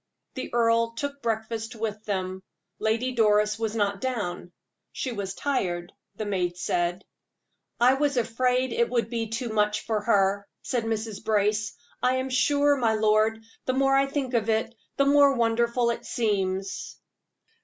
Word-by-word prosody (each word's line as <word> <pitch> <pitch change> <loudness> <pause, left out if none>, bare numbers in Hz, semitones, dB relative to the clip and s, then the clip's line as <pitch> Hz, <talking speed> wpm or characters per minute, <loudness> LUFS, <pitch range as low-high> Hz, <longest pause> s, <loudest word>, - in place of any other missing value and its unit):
The 260 - -6
earl 230 -1 +2
took 280 0 -4
breakfast 225 0 -3
with 215 -1 -4
them; 190 -2 -3 0.4
Lady 225 +4 0
Doris 210 -2 +3
was 225 -1 -2
not 200 -2 0
down 205 -9 -3 0.4
"she 260 - -3
was 200 -4 -4
tired," 180 -11 -2 0.2
the 215 - -4
maid 180 -3 -1
said. 175 0 -1 0.7
"I 245 +2 +6
was 285 0 0
afraid 250 +2 +1
it 235 0 +1
would 235 -2 0
be 230 -1 -1
too 230 +2 -3
much 210 -1 +1
for 220 -2 -1
her," 200 -2 +2 0.2
said 240 -3 -1
Mrs. 220 -2 -3
Brace. 210 0 +1 0.3
"I 255 +1 +3
am 260 0 -2
sure, 285 +2 +3
my 230 -4 +2
lord, 215 +1 +2 0.2
the 255 - 0
more 270 +1 +3
I 275 0 +3
think 275 -2 -3
of 225 -2 +1
it, 220 +1 0 0.2
the 275 - +4
more 280 -1 +5
wonderful 235 +1 +2
it 235 - -5
seems." 195 -4 -2
225 Hz, 155 wpm, -26 LUFS, 210-250 Hz, 0.7 s, I